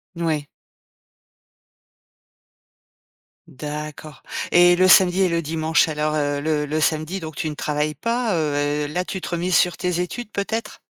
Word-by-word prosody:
Mouais 160 Hz, -4 st, -1 dB, 3.0 s
D'accord 150 Hz, +1 st, -7 dB, 0.3 s
et 175 Hz, 0 st, +6 dB
le 185 Hz, +1 st, +4 dB
samedi 185 Hz, +1 st, +6 dB
et 180 Hz, -, +2 dB
le 170 Hz, 0 st, 0 dB
dimanche 160 Hz, +1 st, +1 dB
alors, 155 Hz, 0 st, -1 dB
heu, 145 Hz, -1 st, 0 dB
le 150 Hz, -1 st, 0 dB
le 155 Hz, +2 st, -1 dB
samedi 155 Hz, +5 st, 0 dB
donc 160 Hz, -2 st, -8 dB
tu 160 Hz, -3 st, -2 dB
ne 150 Hz, -, -6 dB
travailles 150 Hz, 0 st, -2 dB
pas, 230 Hz, -, -1 dB
heu 150 Hz, -3 st, 0 dB
et 145 Hz, 0 st, 0 dB
là 180 Hz, +5 st, -2 dB
tu 190 Hz, -, -5 dB
te -, -, -6 dB
remises 175 Hz, +1 st, 0 dB
sur 180 Hz, -, +2 dB
tes 180 Hz, -1 st, -1 dB
études, 215 Hz, +5 st, -4 dB
peut-être? 215 Hz, +2 st, -4 dB
160 Hz, 155 wpm, -22 LUFS, 150-180 Hz, 3.0 s, et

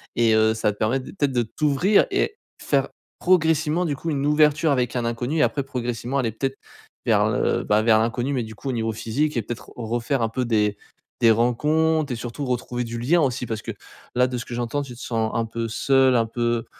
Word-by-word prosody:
Et 115 Hz, -1 st, +3 dB
heu, 110 Hz, 0 st, +4 dB
ça 110 Hz, -1 st, 0 dB
va 105 Hz, -, -1 dB
te -, -, -21 dB
permettre 125 Hz, +5 st, 0 dB
de -, -, -9 dB
peut-être, 145 Hz, -7 st, 0 dB
de 120 Hz, -, +2 dB
t'ouvrir 150 Hz, -, +2 dB
et 440 Hz, 0 st, 0 dB, 0.2 s
faire -, -, +1 dB, 0.3 s
progressivement 160 Hz, -1 st, +2 dB
du 145 Hz, -, -1 dB
coup 165 Hz, -, -5 dB
une 140 Hz, -2 st, -1 dB
ouverture 150 Hz, +1 st, +3 dB
avec 125 Hz, -3 st, 0 dB
un 120 Hz, -, 0 dB
inconnu 120 Hz, +6 st, -2 dB
et 155 Hz, -, +4 dB
après 140 Hz, -, 0 dB
progressivement 125 Hz, 0 st, -3 dB
aller 115 Hz, -4 st, 0 dB
peut-être 135 Hz, +4 st, -3 dB, 0.5 s
vers -, -, +3 dB
le, -, -, 0 dB
bah, 105 Hz, +1 st, +2 dB
vers 110 Hz, -1 st, +4 dB
l'inconnu 120 Hz, +4 st, -1 dB
mais 125 Hz, -3 st, -1 dB
du 110 Hz, -, -8 dB
coup 135 Hz, -, -6 dB
au -, -, +1 dB
niveau 115 Hz, -1 st, -1 dB
physique 125 Hz, +6 st, -1 dB
et -, -, +2 dB
peut-être 120 Hz, +1 st, -8 dB
refaire 120 Hz, +3 st, -1 dB
un 115 Hz, -, +1 dB
peu 125 Hz, +3 st, -2 dB
des 105 Hz, -3 st, +1 dB, 0.4 s
des 115 Hz, -1 st, +6 dB
rencontres 150 Hz, +6 st, +2 dB
et -, -, -1 dB
surtout 120 Hz, +4 st, -6 dB
retrouver 125 Hz, -1 st, -2 dB
du 115 Hz, 0 st, -5 dB
lien 165 Hz, +8 st, +3 dB
aussi. 130 Hz, -3 st, 0 dB
Parce 110 Hz, -2 st, -4 dB
que -, -, -5 dB, 0.4 s
là, 125 Hz, +1 st, +4 dB
de 125 Hz, -1 st, -4 dB
ce 120 Hz, -, -4 dB
que -, -, -8 dB
j'entends, 120 Hz, +4 st, -2 dB
tu 130 Hz, -3 st, -7 dB
te 120 Hz, -, -14 dB
sens 110 Hz, -2 st, -1 dB
un 115 Hz, 0 st, 0 dB
peu 115 Hz, 0 st, -4 dB
seul, 130 Hz, +2 st, +3 dB
un 115 Hz, -, +2 dB
peu 120 Hz, 0 st, -1 dB
125 Hz, 230 wpm, -23 LUFS, 115-145 Hz, 0.5 s, des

